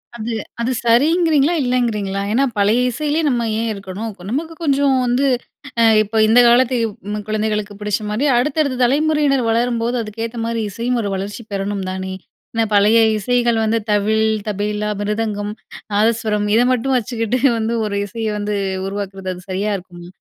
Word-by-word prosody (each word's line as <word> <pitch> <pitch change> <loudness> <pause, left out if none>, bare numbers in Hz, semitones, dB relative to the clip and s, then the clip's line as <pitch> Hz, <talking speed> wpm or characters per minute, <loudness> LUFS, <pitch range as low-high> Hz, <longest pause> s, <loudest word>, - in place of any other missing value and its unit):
அது 230 0 -4 0.3
அது 240 - 0
சரிங்கிறீங்களா? 305 +5 +3
இல்லைங்கிறீங்களா? 220 -6 0
ஏன்னா 260 +5 +2
பழைய 205 +4 +3
இசையிலே 300 +5 -1
நம்ம 240 -3 0
ஏன் 230 0 -1
இருக்கணும்? 200 +3 -6 0.2
நமக்கு 315 +7 -3
கொஞ்சம் 280 -2 +2
வந்து 245 +3 +1 0.6
அ - - +6 0.2
இப்ப 215 +1 -1
இந்த 225 +3 +6
காலத்து 250 +2 +4 0.4
ம் 210 0 -4
குழந்தைகளுக்கு 215 -1 -1
புடிச்ச 210 0 -1
மாரி, 215 +7 0
அடுத்தடுத்த 280 0 0
தலைமுறையினர் 285 0 +2
வளரும்போது, 235 +1 0
அதுக்கேத்த 225 +2 -6
மாரி 230 -1 -2
இசையும் 235 +4 -1
ஒரு 205 - -2
வளர்ச்சி 205 +4 -5
பெறணும் 200 0 -2
தானே. 190 0 -4 0.4
என்ன 225 0 +1
பழைய 205 +3 +5 0.2
இசைகள் 240 +2 +1
வந்து 220 +1 +1
தவில், 215 +1 +2 0.2
தபேலா, 210 +1 -2
மிருதங்கம், 210 0 -2 0.4
நாதஸ்வரம் 215 -1 +1
இத 235 - +5
மட்டும் 260 +2 0
வச்சுக்கிட்டு 235 +1 -1 0.2
வந்து 225 +1 -1
ஒரு 200 - -2
இசையை 220 +1 -3
வந்து 205 0 -2 0.3
உருவாக்கிறது, 195 -1 -5
அது 180 - -12
சரியா 200 +3 -1
இருக்குமா? 175 -1 -12
225 Hz, 150 wpm, -19 LUFS, 205-245 Hz, 0.6 s, அ